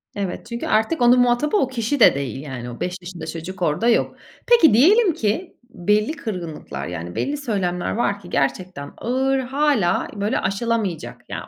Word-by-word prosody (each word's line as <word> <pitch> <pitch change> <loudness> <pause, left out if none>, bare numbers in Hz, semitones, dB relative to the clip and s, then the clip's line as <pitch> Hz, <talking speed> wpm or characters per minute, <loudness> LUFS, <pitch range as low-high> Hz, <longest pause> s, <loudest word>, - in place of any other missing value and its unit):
Evet, 195 -3 -4
çünkü 235 0 -4
artık 235 +7 +1
onun 245 +1 +6
muhatabı 245 +9 +2
o 265 - +2
kişi 260 +2 -2
de 215 - +7
değil 135 -1 -4
yani; 125 -4 -7
o 120 - -9
5 180 0 -2
yaşında 175 -2 -8
çocuk 170 +4 -7
orada 175 +8 +1
yok. 230 - +2 0.3
Peki, 400 - +6
diyelim 365 - +5
ki 320 - -2
belli 210 - +1
kırgınlıklar, 160 - -6
yani 85 0 -6
belli 290 +1 -1
söylemler 195 -10 -2
var 205 -3 0
ki 175 -3 -13
gerçekten 140 +1 -2
ağır; 265 +2 0
hâlâ 265 -6 +1
böyle 205 +1 0
aşılamayacak. 200 -4 -2
Ya, - - -6
210 Hz, 165 wpm, -21 LUFS, 175-255 Hz, 0.3 s, de